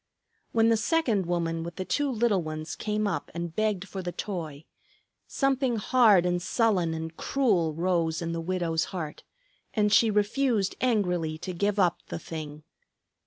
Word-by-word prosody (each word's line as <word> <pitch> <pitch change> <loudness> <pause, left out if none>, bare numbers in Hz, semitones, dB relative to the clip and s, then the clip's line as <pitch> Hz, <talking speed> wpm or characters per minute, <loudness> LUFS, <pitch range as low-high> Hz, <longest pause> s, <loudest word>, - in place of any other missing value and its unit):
When 225 0 +4
the 225 - +4
second 225 - +1
woman 165 -2 -1
with 170 +1 -6
the 185 - -4
two 290 +6 0
little 225 -5 +2
ones 155 0 -5
came 210 0 -1
up 200 -4 -2
and 170 -1 -4
begged 210 -3 0
for 190 - -5
the 175 -1 -4
toy, 160 -7 -5 0.6
something 270 -3 +1
hard 215 -4 +4
and 175 0 0
sullen 185 -5 +1
and 160 0 -5
cruel 185 - +1
rose 165 -2 0
in 170 -1 -3
the 165 0 -3
widow's 165 -2 -1
heart, 160 -5 -6 0.5
and 210 -1 +2
she 225 - +6
refused 210 0 +1
angrily 180 -10 +1
to 185 +3 -6
give 200 +4 0
up 180 -4 +2
the - - -4
thing. 155 -2 -7
185 Hz, 165 wpm, -27 LUFS, 165-215 Hz, 0.6 s, she